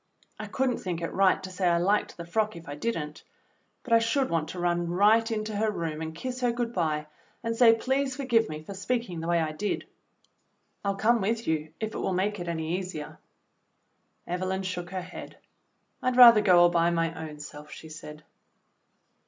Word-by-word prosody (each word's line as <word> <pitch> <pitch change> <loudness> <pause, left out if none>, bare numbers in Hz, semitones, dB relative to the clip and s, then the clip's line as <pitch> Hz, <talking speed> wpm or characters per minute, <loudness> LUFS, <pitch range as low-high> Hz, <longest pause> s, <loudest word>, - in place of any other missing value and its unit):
I - - -5
could 265 -1 0
n't - - -4
think 175 -3 -3
it 165 - -3
right 190 0 +3
to 185 - -7
say 185 0 0
I 170 -1 +3
liked 200 +5 +1
the 170 - -7
frock 215 +4 0
if 170 0 -11
I 145 - -5
did 230 +11 -2
n't, 150 -1 -6 0.6
but 240 - -1
I 230 - +7
should 245 +4 0
want 165 -2 0
to 180 - -6
run 175 -1 0
right 215 +6 +4
into 215 -1 -3
her 215 +1 +1
room 165 -6 -3
and 160 0 -5
kiss 255 +7 -5
her 245 -1 +2
good 235 0 -3
bye, 155 -5 -1 0.4
and 230 0 -1
say, 230 -1 +6
'Please 265 +3 -1
forgive 240 -5 +1
me 155 0 -6
for 200 - -8
speaking 195 -2 -2
the 165 - -5
way 170 0 +2
I 160 -1 -1
did.' 200 +7 -3 1.0
I'll 200 -1 0
come 225 +3 +2
with 225 +4 -1
you 155 -1 -1
if 220 0 -3
it - - -4
will 190 - -1
make 200 +2 -1
it 175 - -5
any 165 +1 -2
easier." 180 -5 -7 1.1
Evelyn 185 +2 -2
shook 180 -2 -4
her 185 -1 -4
head. 180 - -10 0.6
"I'd 255 0 0
rather 235 -3 +10
go 180 -4 +6
all 175 - +7
by 170 0 +2
my 165 -1 0 0.2
own 150 -1 -11
self," 150 0 -10
she 160 - -10
said. 150 0 -10
185 Hz, 210 wpm, -27 LUFS, 165-225 Hz, 1.1 s, rather